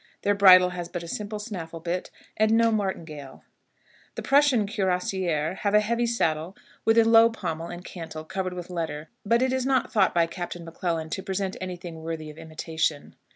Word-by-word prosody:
Their 205 - +3
bridle 185 -2 +8
has 175 -1 -5
but 175 -2 -5
a - - -8
simple 210 +4 -4
snaffle 180 -7 -6
bit, 175 +2 -3 0.3
and 215 +1 +3
no 230 0 +4
martingale. 160 -10 -4 0.7
The - - -5
Prussian 275 -6 +4
cuirassiers 185 -4 -1
have 205 0 +1
a - - +8
heavy 235 +3 0
saddle 170 -6 -1 0.3
with 225 +1 +4
a 230 - +8
low 225 0 +7
pommel 165 -7 -4
and 175 +1 -8
cantle, 160 -3 -7
covered 185 +2 -3
with 180 0 -7
leather, 160 -3 -4
but 235 +4 +3
it 260 0 +1
is 260 -1 0
not 260 -1 +1
thought 195 -5 +3
by 170 -1 +4
Captain 175 0 -6
M'Clellan 165 -1 -3
to - - -2
present 190 0 -3
any 185 -1 -4
thing 170 -2 -9
worthy 160 -1 -5
of 150 - -14
imitation. 160 -1 -3
180 Hz, 190 wpm, -26 LUFS, 165-210 Hz, 0.7 s, bridle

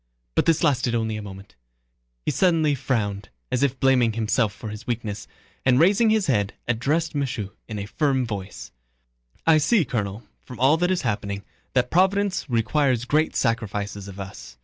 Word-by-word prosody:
But - - +1
this 165 0 +3
lasted 130 -6 +2
only 110 -1 -1
a 105 - -4
moment. 95 -1 -10 0.7
He - - +1
suddenly 165 -5 +3
frowned, 105 -7 -2 0.2
as 125 - +1
if 135 -2 +1
blaming 125 -4 +3
himself 110 0 +1
for 110 +2 -8
his 105 +2 -9
weakness, 110 -3 -3 0.4
and 130 -1 +4
raising 205 +7 +5
his 215 -2 +2
head 105 -8 0
addressed 145 +8 0
Michaud 125 -8 -2 0.2
in 110 - -5
a 100 - -4
firm 135 +2 0
voice: 95 - -6 0.7
"I 160 -1 +6
see, 185 +3 +3
Colonel, 105 -2 -3 0.2
from 125 - -11
all 135 +4 +5
that 180 +2 +1
is 185 -4 0
happening, 100 -3 -2 0.3
that 125 -1 +1
Providence 190 +1 +2
requires 125 +1 +1
great 155 +4 +1
sacrifices 105 -4 -2
of 100 0 -9
us... 95 -10 -9
120 Hz, 170 wpm, -24 LUFS, 105-150 Hz, 0.7 s, I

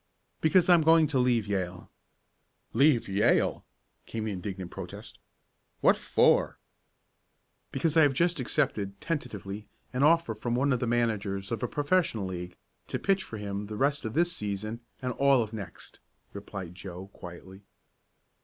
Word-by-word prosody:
"Because 170 +2 +4
I'm 175 -2 +6
going 160 0 +6
to 145 -3 0
leave 120 -4 +2
Yale!" 95 -3 -3 0.9
"Leave 135 0 +4
Yale!" 100 +1 +2 0.4
came 110 -1 -4
the 110 - -2
indignant 95 -1 -5
protest. - - -8 0.6
"What - - +6
for?" - - +3 1.1
"Because 150 +3 0
I 160 - +7
have 145 -3 +5
just 170 +2 +2
accepted, 100 -5 -1
tentatively, 105 - -4 0.3
an 125 - -1
offer 160 -4 +4
from 120 +2 -2
one 135 +2 +2
of 125 - 0
the 125 - -1
managers 110 -4 -1
of 115 - -2
a 125 - 0
professional 145 - +1
league 90 -1 -6 0.3
to - - -2
pitch 195 -1 +1
for 110 - -8
him 100 0 -4
the 105 0 -6
rest 140 +4 +1
of 110 0 -4
this 175 +1 +2
season, 110 +3 -4 0.2
and 125 0 -1
all 135 -1 +4
of 110 0 -9
next," 100 -6 -8 0.3
replied 100 -3 -7
Joe 95 0 -9
quietly. 95 +2 -11
110 Hz, 155 wpm, -29 LUFS, 100-140 Hz, 1.1 s, I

